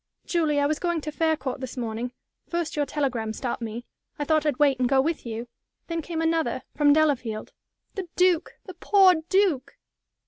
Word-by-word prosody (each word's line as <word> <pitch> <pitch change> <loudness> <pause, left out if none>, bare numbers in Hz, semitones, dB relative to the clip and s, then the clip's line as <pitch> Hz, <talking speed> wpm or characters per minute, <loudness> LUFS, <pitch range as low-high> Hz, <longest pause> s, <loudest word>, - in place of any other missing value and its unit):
"Julie, 315 -4 +1
I 285 - +2
was 300 +1 0
going 345 -2 0
to 305 - -5
Faircourt 300 -5 -1
this 260 0 -7
morning. 235 0 -3 0.4
First 340 -2 -2
your 290 -1 0
telegram 245 -7 -1
stopped 240 +2 -4
me. 230 +1 -5 0.3
I 290 - -2
thought 310 0 +2
I'd 285 -4 +1
wait 280 -3 +3
and 250 -1 +2
go 270 -1 +4
with 305 -2 -1
you. 230 +1 -5 0.4
Then 335 -1 -3
came 325 +1 -3
another, 325 0 0
from 290 -1 +4
Delafield. 275 -8 +1 0.4
The 385 -4 -5
Duke! 360 -2 +2
The 370 - -8
poor 380 +1 +5 0.2
Duke!" 375 -9 +1
295 Hz, 180 wpm, -26 LUFS, 255-330 Hz, 0.4 s, poor